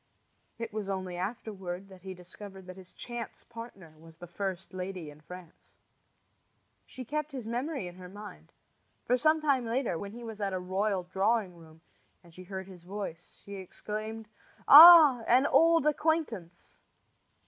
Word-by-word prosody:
It 230 -2 -6
was 210 -2 -4
only 185 -2 -4
afterward 190 -1 -6
that 190 -1 -15
he 190 0 -8
discovered 190 +2 -12
that 185 0 -10
his 185 -1 -14
chance 240 -2 -8
partner 230 -8 -11
was 165 0 -16
the 175 - -10
first 190 +1 -5
lady 185 -4 -6
in 150 +1 -17
France. 175 +1 -14 1.1
She 255 - -9
kept 300 +3 -4
his 255 -4 -6
memory 250 - -3
in 175 0 -11
her 180 -1 -11
mind; 190 - -12 0.5
for 250 - +2
some 310 +4 +3
time 280 -4 +1
later, 230 -7 -2
when 200 0 -7
he 240 +1 -10
was 220 -2 -8
at 195 -1 -2
a 185 - -2
royal 190 +1 -1
drawing 190 +1 0
room 160 -1 -17 0.4
and 170 -1 -19
she 185 +2 -12
heard 190 0 -6
his 185 -2 -13
voice, 180 -2 -8
she 200 0 -8
exclaimed: 215 +3 -7 0.4
"Ah, 310 -4 +10
an 255 +3 +4
old 330 -1 +4
acquaintance!" 295 - -2
195 Hz, 160 wpm, -29 LUFS, 180-235 Hz, 1.1 s, Ah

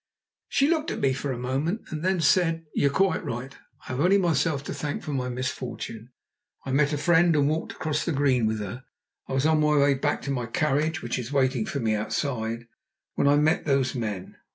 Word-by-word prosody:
She 275 - +3
looked 320 0 +1
at - - -3
me 135 -1 +2
for 135 +1 -3
a 125 - -3
moment 135 - -1
and 155 -1 -4
then 185 -1 +1
said: 165 0 +2
"You 140 - +2
are - - +3
quite 190 +6 +1
right. 125 +4 -5 0.3
I - - -20
have 130 - -3
only 180 +6 +4
myself 160 -5 +1
to - - -5
thank 145 -1 -4
for 150 - -4
my 125 -2 -1
misfortune. 125 -3 -5 0.6
I 135 - -3
met 145 +2 +3
a 150 - 0
friend 170 +2 +4
and 145 -1 +3
walked 155 +2 -2
across 155 -2 -2
the - - -1
green 135 -5 +2
with 110 0 -1
her; 105 +6 -6 0.5
I - - -3
was 135 +2 +1
on 160 0 +4
my 150 0 +3
way 140 0 +5
back 140 +2 -1
to 140 - -3
my 125 -3 -2
carriage 155 +5 0
which 120 +1 -2
is 125 +1 -6
waiting 130 -4 +1
for 140 - -3
me 110 -3 +1
outside 115 +1 -2 0.5
when - - +1
I 145 - +5
met 155 +3 +2
those 135 -3 +1
men. 105 -7 -4
140 Hz, 225 wpm, -26 LUFS, 125-155 Hz, 0.6 s, way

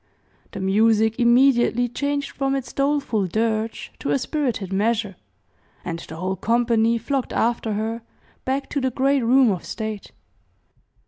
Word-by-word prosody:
The 195 - -5
music 220 +3 +2
immediately 245 0 +4
changed 285 +3 -2
from 275 0 -1
its 255 -3 -5
doleful 275 -8 0
dirge 220 +3 -2
to - - -4
a 145 - +3
spirited 235 - -2
measure, 210 0 0 0.7
and 170 -1 -4
the 160 - -9
whole 185 +3 -2
company 230 +1 +2
flocked 260 +3 -2
after 230 -1 0
her, 220 +2 -3 0.4
back 270 +1 -2
to 285 - -2
the 260 - +1
great 270 +2 +1
room 250 0 +5
of 185 - -3
state. 215 -2 -6
230 Hz, 140 wpm, -22 LUFS, 215-265 Hz, 0.7 s, room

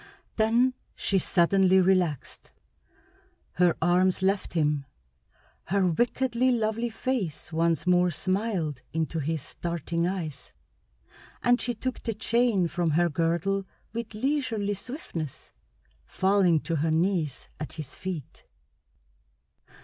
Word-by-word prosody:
Then 235 +4 +3 0.2
she 195 - +1
suddenly 190 +2 +4
relaxed. 180 -6 0 1.1
Her 175 -1 +4
arms 180 +2 +3
left 195 +1 0
him, 150 -4 +1 0.8
her 195 +1 +1
wickedly 245 +7 +1
lovely 230 0 0
face 220 - -3
once 165 +1 +1
more 180 0 +4
smiled 185 - -1
into 160 0 -1
his 155 -1 -2
starting 170 +1 -2
eyes, 170 -7 -5 0.9
and 245 0 +4
she 245 - -1
took 255 +3 -4
the 225 - -3
chain 225 -4 +2
from 170 0 -1
her 170 +3 +3
girdle 170 +5 0 0.3
with 230 -1 -5
leisurely 225 -5 0
swiftness, 200 - -7 0.5
falling 190 - +2
to 165 -2 -2
her 160 +3 +1
knees 160 -4 0
at 155 - -6
his 155 -5 -7
feet. 180 -7 -6
185 Hz, 110 wpm, -27 LUFS, 165-220 Hz, 1.1 s, suddenly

